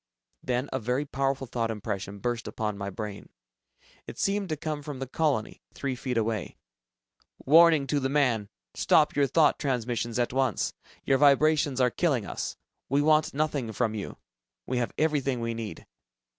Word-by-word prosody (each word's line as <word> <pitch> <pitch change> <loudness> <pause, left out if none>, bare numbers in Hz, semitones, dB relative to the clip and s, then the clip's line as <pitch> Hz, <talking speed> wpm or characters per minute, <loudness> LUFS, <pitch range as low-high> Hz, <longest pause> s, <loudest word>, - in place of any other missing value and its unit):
Then 125 +2 -1
a 130 - 0
very 125 +5 -1
powerful 135 -1 -1
thought 115 -2 -2
impression 100 -2 -4
burst 120 +2 -3
upon 105 -2 -3
my 100 0 -4
brain. 105 0 -7 0.8
It - - -8
seemed 195 -1 0
to 155 - -2
come 150 0 -4
from 145 -1 -6
the 135 - -4
colony, 135 -4 -1
three 135 -2 -2
feet 125 -1 -3
away. 110 -3 -2 0.9
"Warning 160 0 +6
to 145 +1 0
the 135 -1 -1
man. 125 -8 +1 0.2
Stop - - +3
your 140 -1 +3
thought 155 +3 +3
transmissions 120 -4 -1
at 120 0 0
once! 130 -1 0 0.3
Your 135 -1 +3
vibrations 145 -1 +4
are 125 -1 +3
killing 135 - +1
us. - - -4 0.3
We 140 +2 +2
want 155 -1 +3
nothing 145 -6 -1
from 110 0 0
you. 105 -2 -6 0.5
We 125 -1 -1
have 120 - -1
everything 140 -5 +1
we 115 0 -2
need. 110 -7 -6
130 Hz, 165 wpm, -28 LUFS, 115-145 Hz, 0.9 s, Warning